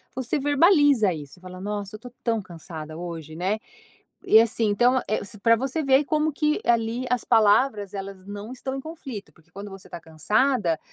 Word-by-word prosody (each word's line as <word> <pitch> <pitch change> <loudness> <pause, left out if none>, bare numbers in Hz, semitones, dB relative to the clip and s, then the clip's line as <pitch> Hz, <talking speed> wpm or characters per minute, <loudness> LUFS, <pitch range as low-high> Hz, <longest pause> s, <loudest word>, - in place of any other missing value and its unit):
você 260 +3 -1
verbaliza 290 - +4
isso, 150 +1 -10
fala: 185 0 -10
"Nossa 205 0 -4
eu - - -6
estou 245 +2 -12
tão 225 -2 0
cansada 160 -3 -9
hoje", 165 -3 -7
né, 190 +6 -1 0.7
e 220 - +7
assim 230 0 +2
então, 245 +5 +3
eh, 215 - -1
se 205 - -9
pra 230 +2 +5
você 270 +6 -2
ver 270 -1 +5
que 295 - -2
como 310 +2 +1
que 300 +3 +1
ali 235 +1 +1
as 250 -1 0
palavras 210 -1 +3
elas 195 -1 -7
não 205 +3 -7
estão 265 +1 -5
em 270 - -5
conflito, 275 -9 -8
porque 160 - -26
quando 200 +1 -8
você 195 -1 -11
está - - -8
cansada, 170 - 0
215 Hz, 190 wpm, -25 LUFS, 190-260 Hz, 0.7 s, e